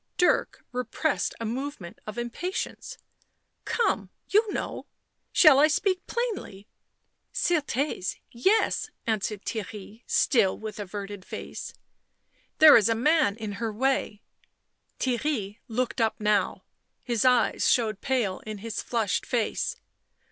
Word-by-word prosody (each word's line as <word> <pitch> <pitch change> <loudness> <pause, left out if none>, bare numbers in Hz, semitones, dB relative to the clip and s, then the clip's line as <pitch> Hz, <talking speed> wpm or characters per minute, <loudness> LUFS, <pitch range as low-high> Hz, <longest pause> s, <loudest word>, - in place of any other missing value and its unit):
Dirk 360 - +2
repressed 250 +5 -1
a 230 - -3
movement 240 -6 -5
of 215 - -6
impatience. 240 +11 -4 0.3
" - - -48 0.3
Come, 470 - 0 0.2
you 425 +1 +3
know. - - -4 0.4
Shall 305 -5 +7
I 300 - +7
speak 370 +4 0
plainly?" 475 - -3
u 200 - -17 0.7
Certes! 290 - 0
— - - -46 0.2
yes," 435 +3 +2 0.2
answered 210 -2 -2
Theirry, 215 0 -6
still 225 -9 +3
with 215 -1 -7
averted 205 0 -6
face. - - -7 0.4
" - - -41
There 310 -1 +10
is 220 -1 +5
a 225 - +2
man 295 -3 +3
in 215 -2 -5
her 225 -1 -1
way." 230 -2 -1 0.8
Theirry 240 -5 -1
looked 245 +1 -1
up 220 -1 +1
now; 210 -1 +1 0.4
his 235 -4 0
eyes 250 -1 +3
showed 220 -4 +2
pale 240 -8 0
in 215 -1 -7
his 220 +1 -4
flushed 225 -5 0
face. 235 -4 -1
230 Hz, 130 wpm, -27 LUFS, 210-290 Hz, 0.8 s, There